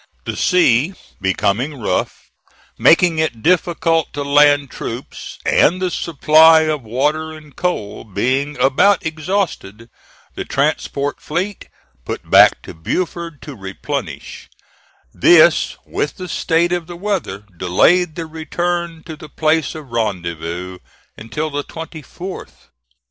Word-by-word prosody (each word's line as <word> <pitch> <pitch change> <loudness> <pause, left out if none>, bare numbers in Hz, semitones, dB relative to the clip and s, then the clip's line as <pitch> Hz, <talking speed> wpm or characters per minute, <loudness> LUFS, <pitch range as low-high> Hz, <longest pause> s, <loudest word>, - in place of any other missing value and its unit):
The - - -4
sea 175 -2 +3 0.3
becoming 105 +9 -1
rough, 110 - -3 0.4
making 165 -1 +4
it 120 -8 -2
difficult 165 -2 +1
to 145 - -3
land 145 -1 +4
troops, 120 +3 -7
and 180 +4 +3
the 185 -1 -1
supply 160 0 +5
of 155 -2 -1
water 150 +7 -1
and 150 -3 -14
coal 175 - -3
being 130 +8 -1
about 175 +10 +3
exhausted, 155 - -3 0.4
the - - -5
transport 140 0 -1
fleet 185 +6 -4 0.3
put - - -6
back - - +6
to - - -9
Beaufort 170 - -4
to 145 - -8
replenish; 95 -3 -6 0.6
this, - - +5
with 145 - -3
the 185 - -6
state 170 0 +1
of 175 -2 -2
the 175 -1 -8
weather, 195 - -3
delayed 155 - +2
the 165 - -4
return 165 +1 -3
to 160 - -8
the 150 0 -12
place 155 -2 0
of 150 -5 -10
rendezvous 90 -4 -3 0.4
until 150 +8 -4
the 145 0 -3
24th. 165 +4 -9
155 Hz, 120 wpm, -18 LUFS, 125-170 Hz, 0.6 s, back